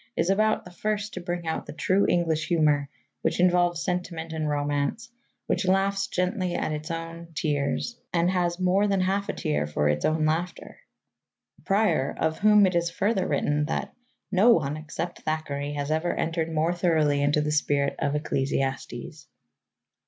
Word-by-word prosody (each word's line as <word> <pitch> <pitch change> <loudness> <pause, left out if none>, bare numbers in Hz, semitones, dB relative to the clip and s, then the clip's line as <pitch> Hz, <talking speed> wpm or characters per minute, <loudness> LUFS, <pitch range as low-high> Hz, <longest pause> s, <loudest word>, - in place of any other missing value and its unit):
is 170 +3 +2
about 215 +2 +2
the 180 - -11
first 210 +3 -2
to 185 - -5
bring 175 -1 -4
out 160 - -3
the - - -7
true 185 +5 +2
English 165 -3 +1
humour 150 -4 +2 0.3
which - - 0
involves 175 -1 +3
sentiment 175 -3 -3
and 155 -1 -2
romance, 145 +10 -1 0.3
which 185 +1 -1
laughs 195 +1 +2
gently 180 0 -1
at - - -1
its 155 0 -4
own, 165 0 -5
tears, 145 +11 -1
and 175 +1 +2
has 175 -1 0
more 185 +3 +3
than 195 -1 +1
half 195 +2 0
a - - 0
tear 75 0 -1
for 75 0 0
its 75 0 0
own 155 0 +2
laughter" 165 +3 -2 0.9
Prior, 195 -9 +2
of 160 0 0
whom 210 -1 +6
it 185 - +1
is 170 0 +1
further 195 +2 0
written 150 0 +1
that - - -3 0.4
"no 200 +5 +5
one, 150 -10 +3
except 160 +3 -5
Thackeray, 145 -2 -3
has 145 0 -3
ever 160 +2 0
entered 165 0 -1
more 160 +2 +1
thoroughly 155 -5 +2
into 145 +1 +2
the 150 0 -1
spirit 145 -2 +1
of 145 - 0
Ecclesiastes." 135 -1 -2
165 Hz, 165 wpm, -26 LUFS, 150-185 Hz, 0.9 s, whom